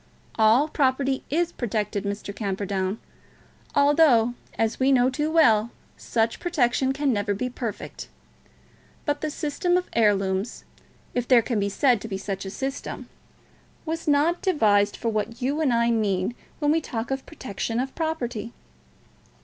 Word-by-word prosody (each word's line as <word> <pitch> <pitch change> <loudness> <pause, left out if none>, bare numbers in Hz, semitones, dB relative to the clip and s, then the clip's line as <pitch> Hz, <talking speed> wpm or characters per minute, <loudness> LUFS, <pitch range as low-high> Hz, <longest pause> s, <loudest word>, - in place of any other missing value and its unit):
"All 225 +6 +4
property 270 -2 +1
is 345 +4 +1
protected, 210 - -2
Mr. 200 0 -4
Camperdown; 195 -1 -2 0.8
although, 285 -5 +5 0.2
as 225 0 0
we 265 +1 +3
know 255 -1 +4
too 300 +3 -1
well, 235 -9 +4 0.3
such 230 0 -1
protection 265 -6 +1
can 275 -1 0
never 205 -1 0
be 250 +5 -3
perfect. 235 -4 -6 1.0
But 290 -1 -1
the 310 - -1
system 320 +4 0
of 360 - -2
heirlooms, 200 -1 +1 0.5
if 245 -1 -1
there 245 -3 +6
can 230 -2 -1
be 200 0 0
said 245 +1 +2
to - - -6
be 195 -3 -3
such 195 0 -5
a - - -4
system, 270 +6 -5 0.8
was 325 0 -4
not 300 +4 +3
devised 210 - +3
for 230 - -1
what 225 +2 -2
you 280 +5 -1
and 290 -5 +2
I 235 0 +2
mean 205 -2 0 0.2
when 295 -1 +1
we 325 +1 +2
talk 235 -3 -4
of 270 0 -3
protection 230 -5 -4
of 265 +1 -2
property." 250 -9 -3
240 Hz, 150 wpm, -25 LUFS, 210-290 Hz, 1.0 s, there